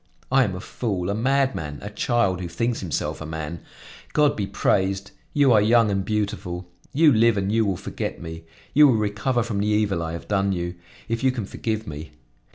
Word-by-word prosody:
I 135 0 +5
am 95 -4 -3
a - - -5
fool, 100 -3 -3
a - - 0
madman, 125 - 0
a 105 - -6
child 105 -4 +1
who 90 - -3
thinks 115 +7 -1
himself 85 -3 -3
a - - -5
man. 80 +1 -5 0.5
God 150 -1 +4
be 100 -2 -2
praised! 95 +1 0 0.2
You 140 -4 +4
are 105 - +6
young 115 0 +4
and 95 -1 0
beautiful. 95 -4 -3 0.2
You 150 0 +5
live 115 -1 +4
and 100 0 0
you 110 -1 +2
will 95 -3 0
forget - - -5
me. 80 -1 -8 0.3
You 150 0 +8
will 130 - +4
recover 110 +4 0
from 110 -3 -3
the 105 - 0
evil 105 -4 +1
I 80 0 -3
have 85 - -7
done 100 -1 +1
you, 85 -1 -3 0.3
if 115 +2 -2
you 130 - +4
can 120 -5 -4
forgive 110 +2 -3
me. 75 +1 -8
105 Hz, 205 wpm, -24 LUFS, 90-115 Hz, 0.5 s, You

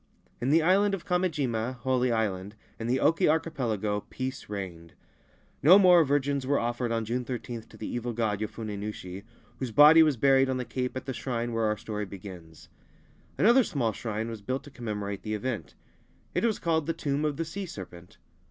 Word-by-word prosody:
In 125 - 0
the 160 +2 +4
island 195 +3 +3
of 180 - -11
Kamijima 140 -10 0
(Holy 130 -1 +1
Island) 105 -3 -1 0.2
in 115 - -3
the 130 +2 +1
Oki 165 +1 +3
Archipelago 120 -10 0
peace 130 -2 -5
reigned. 90 -5 -7 0.7
No 175 +8 +8
more 180 -4 +7
virgins 140 -1 0
were 140 0 +2
offered 120 0 -1
on 115 -1 -1
June 125 +3 -2
13 120 -1 -5
to - - -17
the 110 - -6
evil 120 0 -3
god, 110 -3 -1
Yofune 110 0 -5
Nushi, 100 -3 -6 0.4
whose 130 - -3
body 150 +7 +8
was 155 -5 +3
buried 135 +1 +4
on 130 - 0
the 125 - -3
Cape 125 +2 -3
at 130 - -6
the 135 - -3
shrine 120 -1 -3
where 115 -1 +1
our 105 0 0
story 105 -1 -4
begins. 90 -5 -11 0.7
Another 240 +6 +5
small 120 - -1
shrine 110 +1 -4
was 115 -2 -6
built 130 +6 -3
to 145 - -13
commemorate 105 -5 -4
the 110 -1 -3
event. 105 - -4 0.6
It - - +1
was 220 -3 +1
called 160 -3 0
the 165 - +1
Tomb 145 -2 -2
of 150 -2 -1
the 165 - -2
Sea 195 +4 -5
Serpent. 90 - -10
125 Hz, 190 wpm, -28 LUFS, 110-145 Hz, 0.7 s, No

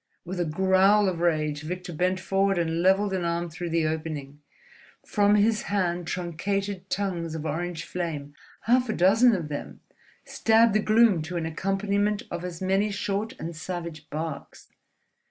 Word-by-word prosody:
With 180 +1 -5
a 175 - +1
growl 190 +5 +4
of 180 -3 -1
rage, 155 -3 0
Victor 180 +2 -5
bent 185 +3 0
forward 195 0 +1
and 165 -1 0
levelled 190 +2 +3
an 185 -2 -1
arm 170 0 -2
through 175 +2 -5
the 165 -1 +1
opening. 155 -3 -4 0.6
From 205 -1 +3
his 215 +1 +3
hand 180 -4 0
truncated 190 +3 -3
tongues 175 -5 -2
of 160 -1 -5
orange 165 +2 -3
flame, 155 -5 -4 0.3
half 245 +1 +2
a - - +1
dozen 215 +7 +5
of 170 -5 -3
them, 145 - -6 0.4
stabbed 225 0 +3
the 215 - +3
gloom 215 -4 +4
to 175 +3 -4
an 165 - -2
accompaniment 200 +4 0
of 175 0 -4
as 180 0 -6
many 195 +3 +2
short 205 +1 -2
and 165 0 -6
savage 165 -2 -6
barks. 155 -1 -6
180 Hz, 160 wpm, -26 LUFS, 165-200 Hz, 0.6 s, dozen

